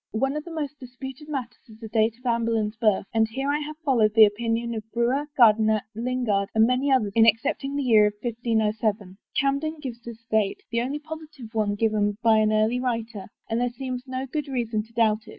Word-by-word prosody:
One 270 +6 0
of 300 - -3
the 340 - -8
most 295 -3 -5
disputed 265 +3 -9
matters 260 -5 -5
is 215 - -14
the 225 0 -8
date 220 +1 +1
of 250 - -26
Anne 235 -1 +1
Boleyn's 225 -2 0
birth, 215 -4 +1
and 220 -1 +3
here 270 +5 -2
I 295 - 0
have 305 0 -6
followed 225 -6 +3
the 220 -1 +9
opinion 230 +2 -1
of 220 - -3
Brewer, 245 +5 +1
Gairdiner, 220 -3 +5
Lingard, 230 -4 -1
and 220 0 +6
many 255 +3 +1
others 220 -7 +2
in 225 0 +6
accept 225 +4 +2
ing 275 +1 -3
the 285 - -1
year 220 -4 +5 0.2
1507. 220 -4 -1 0.2
Camden 280 +3 0
gives 250 -5 -7
this 230 -1 -11
date, 215 -3 +1
the 235 0 +1
only 270 +4 -2
positive 305 -6 -10
one 210 -2 0
given 205 -1 +1
by 225 -1 +5
an 215 0 +2
early 215 +3 +2
writer, 230 -5 -3 0.2
and 225 +1 -1
there 245 - +1
seems 255 +1 -6
no 260 +1 -3
good 295 +3 -4
reason 235 -5 -1
to 225 +2 -16
doubt 220 -1 +1
it. - - -11
230 Hz, 215 wpm, -25 LUFS, 220-265 Hz, 0.2 s, the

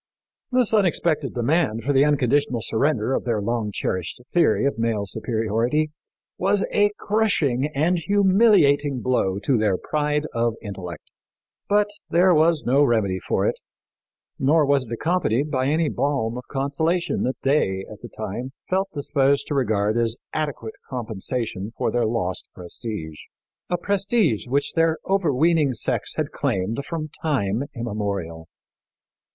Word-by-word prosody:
This 250 -3 +2
unexpected 170 -8 +1
demand 120 -2 +1
for 140 +4 +1
the 135 0 +5
unconditional 140 -3 +1
surrender 120 0 +1
of - - 0
their 115 -3 0
long 110 0 -2
cherished 95 -1 -3
theory 170 -5 +3
of 140 -4 -1
male 115 -3 0
superiority 115 +8 -1 0.5
was 195 +2 +2
a 205 0 +4
crushing 165 - +1
and 170 +5 +2
humiliating 185 - +3
blow 100 -7 +1
to 125 0 +2
their 105 -4 +2
pride 150 +3 -1
of 115 -1 0
intellect, 90 -6 -8 0.6
but 205 0 +3 0.2
there 180 +2 +4
was 160 0 +3
no 135 +4 +4
remedy 110 -8 +1
for - - -1
it, - - 0 0.8
nor 150 +3 +4
was 140 -2 +2
it 115 - -13
accompanied 145 0 0
by 130 -2 0
any 155 +2 +2
balm 130 -5 -1
of 125 0 -7
consolation 155 +6 -1
that 130 - -1
they, 95 -9 +1
at 105 - -11
the - - -9
time, 110 +5 -6 0.2
felt 190 +1 +1
disposed 140 -1 +1
to - - -4
regard 110 -5 +1
as 115 0 +1 0.2
adequate 145 -7 -3 0.2
compensation 110 -3 -3
for - - 0
their 120 -2 +1
lost 100 -5 -2
prestige 90 -3 -6 0.5
a 175 - +1
prestige 200 - 0
which 140 +3 0
their 165 -1 +2
overweening 160 -6 +2
sex - - 0
had - - -2
claimed 100 +8 -1
from 160 -2 -4
time 125 -5 0
immemorial. 100 -8 -4
135 Hz, 140 wpm, -23 LUFS, 110-155 Hz, 0.8 s, the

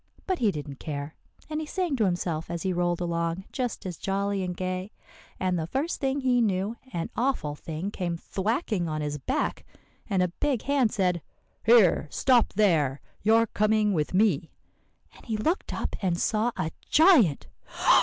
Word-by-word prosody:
But 375 -2 -1
he 225 - +3
didn't 145 -6 -5
care, 145 0 -5 0.3
and 310 0 -3
he 310 - -5
sang 355 -3 -1
to 220 - +3
himself 175 -3 -1
as 170 -1 -3
he 190 -1 0
rolled 175 0 0
along 170 +1 -1
just 250 -6 -3
as 180 -4 -4
jolly 200 0 -1
and 180 -1 -4
gay; 185 +2 -3 0.5
and 185 -2 0
the 160 - -3
first 280 - -2
thing 275 0 0
he 250 -2 +3
knew, 200 0 0 0.2
an 170 -4 -3
awful 240 - 0
thing 160 +6 -5
came 175 -4 -3
thwacking 200 - -1
on 155 0 -2
his 150 0 -3
back, - - -1 0.5
and 190 -2 +2
a 180 - 0
big 265 +6 -1
hand 270 -5 +2
said, 180 -6 +1 0.4
'Here, 220 -9 +5
stop 250 - +3
there! 160 -10 +2 0.2
you're 225 +2 +4
coming 215 -1 +2
with 155 +1 -1
me.' 185 -6 +3 0.7
And - - -16
he 220 -2 -1
looked 320 - -1
up - - -3
and 180 -3 +1
saw 220 +4 +1
a 160 - -1 0.2
giant." 295 - +5
190 Hz, 175 wpm, -27 LUFS, 170-230 Hz, 0.7 s, Here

